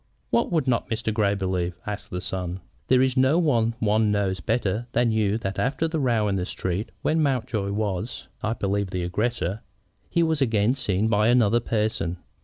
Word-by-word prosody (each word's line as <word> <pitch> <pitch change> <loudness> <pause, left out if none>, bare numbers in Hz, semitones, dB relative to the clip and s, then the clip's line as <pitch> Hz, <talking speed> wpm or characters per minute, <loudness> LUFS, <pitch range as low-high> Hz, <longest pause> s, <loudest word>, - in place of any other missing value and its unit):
"What 235 - +2
would 160 -6 +1
not 120 -2 +1
Mr. 110 -1 -1
Grey 105 -2 +2
believe?" 90 -2 -2
asked 105 -1 -5
the 90 - -4
son. 90 0 -4 0.3
"There 130 0 +5
is 130 -1 +1
no 130 +4 +4
one 115 -9 +2
one 110 -1 +2
knows 100 -2 0
better 110 +1 -1
than 120 0 +3
you 110 -1 +1
that 95 -4 -4
after 145 +5 0
the 160 0 -2
row 115 -6 +2
in 100 -1 0
the 90 - -1
street, 95 +3 -3
when 160 +1 +2
Mountjoy 125 -8 0
was, 105 +2 -3
I 110 +1 0
believe, 100 -2 -1
the 90 -1 -2
aggressor, 105 +1 -1 0.5
he 170 - +2
was 160 -3 0
again 110 -2 +3
seen 105 -6 0
by 105 -1 +3
another 120 -2 +4
person. 105 -7 -1
110 Hz, 190 wpm, -25 LUFS, 100-125 Hz, 0.5 s, There